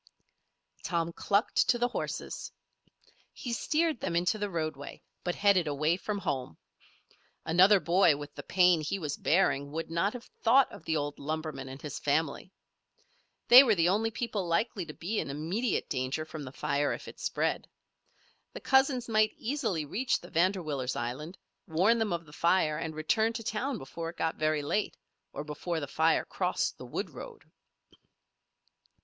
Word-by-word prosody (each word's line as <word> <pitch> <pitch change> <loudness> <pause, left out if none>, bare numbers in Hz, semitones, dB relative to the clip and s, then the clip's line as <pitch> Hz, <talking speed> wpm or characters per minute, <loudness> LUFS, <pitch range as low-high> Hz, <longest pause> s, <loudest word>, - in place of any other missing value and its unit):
Tom 170 -1 -1
clucked 205 +5 +1
to 240 - +4
the 245 +1 +1
horses. - - -5 0.8
He 240 - -5
steered 310 +3 0
them 170 - -2
into 180 +5 +1
the 205 0 -2
roadway, 155 -5 -5 0.2
but 175 - -1
headed 200 -5 +3
away 150 +3 +1
from 205 +3 -3
home. 130 - -3 0.9
Another 185 +5 +6
boy 170 -4 +4
with 145 0 -8
the - - -7
pain 180 -3 +4
he 155 +6 -2
was 150 -6 -3
bearing 140 -5 +1
would 165 +1 -4
not 170 +5 +1
have 245 0 -8 0.2
thought 255 +4 +5
of 160 - -12
the 160 - 0
old 145 0 -3
lumberman 155 -3 -4
and 135 +1 -8
his 150 -2 -5
family. 150 +4 -1 1.0
They 245 +2 +11
were 225 -5 +3
the 170 -1 +3
only 215 +4 +1
people 215 -4 -3
likely 175 +1 0
to 150 - -7
be 210 +6 -2
in - - -3
immediate 175 - -1
danger 130 +3 -2
from 155 -2 -7
the 130 - -8
fire 145 +1 0
if - - -8
it - - -11
spread. - - -1 0.9
The - - -6
cousins 265 - +2
might 215 -1 +3
easily 225 - -2
reach 245 - 0
the 175 - -13
Vanderwiller's 160 -7 0
island, 135 +9 -5 0.3
warn 190 +8 +3
them 220 -2 0
of 170 -1 -2
the 150 - -16
fire, 160 -2 +2
and 160 -1 -4
return 220 +9 +1
to 230 0 -5
town 235 +5 -2
before 165 +3 -6
it 170 - -11
got 160 0 0
very 155 -1 +1
late, 205 +8 -1 0.3
or - - -5
before 155 +3 -3
the 145 - -3
fire 160 +3 +2
crossed - - -1
the - - -8
wood - - -4
road. - - -10
170 Hz, 170 wpm, -30 LUFS, 150-215 Hz, 1.0 s, They